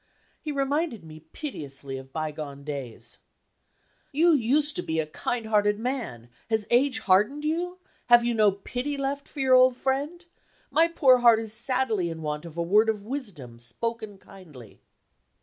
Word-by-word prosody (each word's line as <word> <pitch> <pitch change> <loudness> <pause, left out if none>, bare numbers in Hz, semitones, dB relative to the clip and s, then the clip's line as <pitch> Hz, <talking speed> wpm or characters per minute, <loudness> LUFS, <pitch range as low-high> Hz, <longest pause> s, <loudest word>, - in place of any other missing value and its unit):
He 305 - -4
reminded 280 - -1
me 155 0 -11
piteously 140 - -7
of 135 0 -14
bygone 150 -2 -5
days: 140 -6 -8 0.9
"You 325 +4 +4
used 290 +2 +2
to - - 0
be 160 0 -2
a 160 - 0
kind 225 +9 -3
hearted 210 -1 +2
man. 225 - -4 0.2
Has 220 -2 0
age 255 +1 +3
hardened 210 +11 +2
you? 350 +3 -2 0.3
Have 240 -1 +6
you 240 - +1
no 215 -2 +4
pity 250 +8 -4
left 275 +1 -3
for 285 - -6
your 260 -1 +3
old 255 -1 +6
friend? 290 +7 -2 0.5
My 330 +1 +4
poor 270 -7 +4
heart 235 -2 +6
is 220 -1 -2
sadly 230 -5 0
in 160 -1 -7
want 150 +1 -3
of 165 -1 -11
a 170 - 0
word 210 +6 +4
of 210 -2 -2
wisdom, 190 - -6
spoken 220 - -5
kindly." 155 - -15
225 Hz, 165 wpm, -26 LUFS, 160-275 Hz, 0.9 s, Have